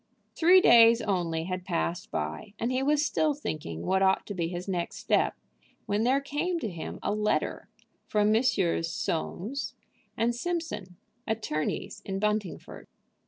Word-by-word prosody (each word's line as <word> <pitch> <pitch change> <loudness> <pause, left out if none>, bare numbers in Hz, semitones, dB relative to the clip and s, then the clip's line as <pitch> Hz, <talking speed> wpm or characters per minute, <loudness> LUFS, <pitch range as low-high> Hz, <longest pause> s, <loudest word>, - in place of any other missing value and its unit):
Three 360 +3 +6
days 230 -4 +7
only 175 -5 -1
had 185 +1 -4
passed 175 -1 -2
by, 210 -1 -4
and 235 +2 -1
he 255 +1 0
was 295 +2 +2
still 300 +1 +1
thinking 155 - -5
what 190 +1 +2
ought 190 0 +3
to 205 - -5
be 170 -3 -1
his 175 +2 -5
next 175 -3 -2
step, - - +1 0.5
when 205 +2 0
there 265 +3 +4
came 300 +5 -2
to 220 - -3
him 170 -2 -6
a 205 - 0
letter 210 0 -1 0.4
from 210 0 +2
Messrs. 200 -8 +2
Soames 195 - -3 0.4
& 230 +1 +2
Simpson, 245 - -4 0.3
attorneys 205 -2 -2
in 195 -1 -3
Buntingford. 210 -2 -3
210 Hz, 150 wpm, -28 LUFS, 180-255 Hz, 0.5 s, days